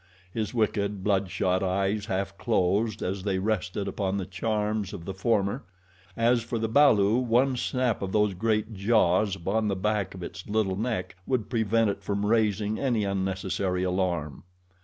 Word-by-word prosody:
His 110 -2 -2
wicked, 105 -4 0
blood 100 -2 +1
shot 95 0 0
eyes 100 +3 0
half 100 -1 -2
closed 105 0 +1
as 95 +1 -2
they 95 -1 -1
rested 100 -1 -1
upon 100 -1 -1
the 95 - -3
charms 105 +1 -2
of 85 - -7
the 95 - -4
former 100 0 0 0.5
as 120 +1 +3
for 115 +1 -3
the 110 0 -1
balu, 110 -4 +5
one 125 +3 +2
snap 125 -2 0
of 95 -1 -3
those 105 -1 +2
great 110 +3 0
jaws 100 -1 +2
upon 100 +4 -1
the 100 - 0
back 105 0 -1
of 90 - -8
its 95 +1 -8
little 105 -3 +1
neck 100 -4 -3
would 125 -5 -1
prevent 115 -2 +2
it 100 - -7
from 100 0 -2
raising 105 -1 +1
any 120 -6 +1
unnecessary 95 -1 -1
alarm. 90 -6 -1
100 Hz, 165 wpm, -27 LUFS, 95-110 Hz, 0.5 s, balu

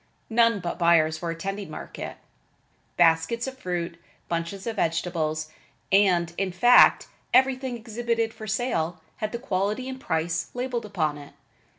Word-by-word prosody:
None 230 -2 +4
but 170 0 -4
buyers 160 -2 +3
were 170 - -3
attending 195 +3 -4
market. - - -7 0.8
Baskets 165 +7 +3
of 265 0 -7
fruit, 175 -4 -3 0.3
bunches 170 +3 -3
of 225 -2 -3
vegetables 160 -3 -1 0.4
and, 180 -4 +3
in 195 -1 0
fact, 240 +8 +6 0.3
everything 260 -1 +3
exhibited 230 0 -2
for 220 -1 -9
sale, 195 -7 -1 0.2
had 215 0 -3
the 235 - -3
quality 210 +1 -2
and 260 0 -6
the - - -19
price 160 0 -1
labeled 245 -2 -2
upon 155 -8 -1
it. 145 - -13
195 Hz, 145 wpm, -26 LUFS, 165-235 Hz, 0.8 s, fact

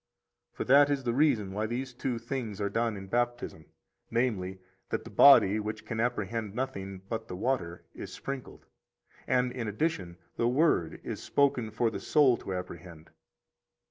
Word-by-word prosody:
45 - - -32
For - - -1
that 145 0 +7
is 140 -2 0
the 120 - 0
reason 125 -8 +2
why 105 +3 -2
these 125 +3 -4
two 125 0 -2
things 115 -3 -4
are 100 -1 -1
done 115 -1 0
in 95 - -8
Baptism, 120 -6 -2 0.4
namely, 100 -6 -1 0.3
that - - -2
the - - -11
body, 110 -7 +7
which 105 +1 -5
can 115 -2 -4
apprehend 110 -2 -2
nothing 100 -7 -4
but 110 0 -4
the 90 - -6
water, 90 -6 -2
is - - -8
sprinkled, 135 -2 -7 0.6
and, 125 0 +2
in 120 -3 -4
addition, 105 - -2 0.2
the 115 - +2
word 125 - +2
is - - -5
spoken 135 -5 +1
for 115 +1 0
the - - -4
soul 145 -5 +4
to - - -7
apprehend. 85 -3 -7
115 Hz, 170 wpm, -29 LUFS, 95-130 Hz, 0.6 s, that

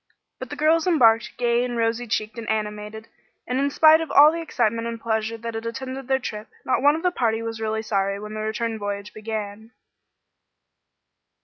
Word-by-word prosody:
But - - -7
the - - -6
girls 320 +2 +2
embarked 230 -9 +3
gay 240 0 +2
and 245 -1 -3
rosy 230 +1 0
cheeked 215 +2 -2
and 225 - -6
animated, 210 0 -4 0.4
and 250 +2 -1
in 280 +1 +1
spite 315 +2 +6
of 325 - -4
all 295 +2 +7
the 335 +1 -4
excitement 230 -7 -1
and 230 -1 -5
pleasure 220 0 -2
that 230 0 -6
had 225 +1 -5
attended 260 +2 -6
their 265 0 +2
trip, 215 -4 -6 0.2
not 260 - +1
one 290 +2 +5
of 325 - -5
the 360 - +2
party 230 -7 0
was 225 -1 -5
really 220 0 -2
sorry 200 -2 -1
when 210 +1 -8
the 215 - -5
return 220 +1 -2
voyage 205 0 -5
began. 215 +1 -6
230 Hz, 195 wpm, -23 LUFS, 215-260 Hz, 0.4 s, all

